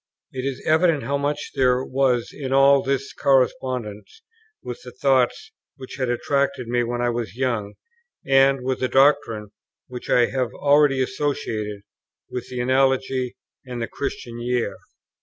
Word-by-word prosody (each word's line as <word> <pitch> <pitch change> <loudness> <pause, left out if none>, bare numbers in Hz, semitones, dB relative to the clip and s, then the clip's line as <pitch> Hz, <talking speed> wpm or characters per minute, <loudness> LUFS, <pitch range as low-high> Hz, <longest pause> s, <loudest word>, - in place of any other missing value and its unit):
It 130 0 -5
is 135 -1 -4
evident 160 -2 +3
how 140 - -1
much 145 +1 -2
there 130 -1 +2
was 130 -3 +1
in 135 -3 -5
all 135 0 +5
this 135 0 -2
in - - -17
correspondence 130 - 0 0.4
with 125 - -7
the 125 - -9
thoughts 135 - +1 0.2
which 130 -3 -10
had 130 -2 -1
attracted 130 0 0
me 120 +1 +1
when 120 +1 -3
I 120 - +2
was 115 -5 -4
young, 120 -6 -2 0.5
and 135 0 +4
with 130 0 -1
the 130 - 0
doctrine 135 -6 +2 0.4
which 125 -1 -9
I 120 - +5
have 130 -2 -1
already 145 -2 +3
associated 110 -8 -3 0.5
with 125 - -5
the 125 -1 -3
Analogy 130 0 +1 0.3
and 125 -2 -6
the 115 - -2
Christian 120 -4 -5
Year. 120 -5 -1
130 Hz, 155 wpm, -23 LUFS, 120-135 Hz, 0.5 s, all